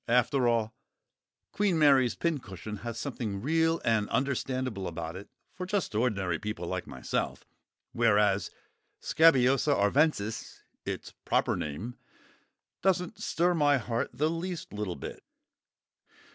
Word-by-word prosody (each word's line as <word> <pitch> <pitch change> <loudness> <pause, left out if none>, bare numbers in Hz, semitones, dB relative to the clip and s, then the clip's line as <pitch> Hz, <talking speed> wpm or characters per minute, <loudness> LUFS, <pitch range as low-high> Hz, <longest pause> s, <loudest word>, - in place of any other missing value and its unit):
After 125 +2 +3
all, 115 -2 +1 0.8
"Queen 200 -4 +1
Mary's 135 -5 +5
Pincushion" 110 - -3
has 115 +2 -6
something 115 -6 -3
real 160 +6 +2
and 110 -2 +2
understandable 130 -6 -1
about 85 0 -5
it 100 +2 -9 0.2
for 180 0 -6
just 195 - -1
ordinary 100 -7 0
people 105 -5 -4
like 95 +1 -3
myself; 65 -2 -3 0.5
whereas 105 -4 +3 0.5
Scabiosa 135 -2 +4
arvensis 110 0 +1 0.2
(its - - -5
proper - - +1
name) 100 +12 -5 0.8
doesn't 180 -2 0
stir 175 +2 +2
my 145 -4 +4
heart 120 0 -2
the 150 - 0
least 170 - -4
little 105 -4 -3
bit. 70 - -8
120 Hz, 115 wpm, -29 LUFS, 105-150 Hz, 0.8 s, Mary's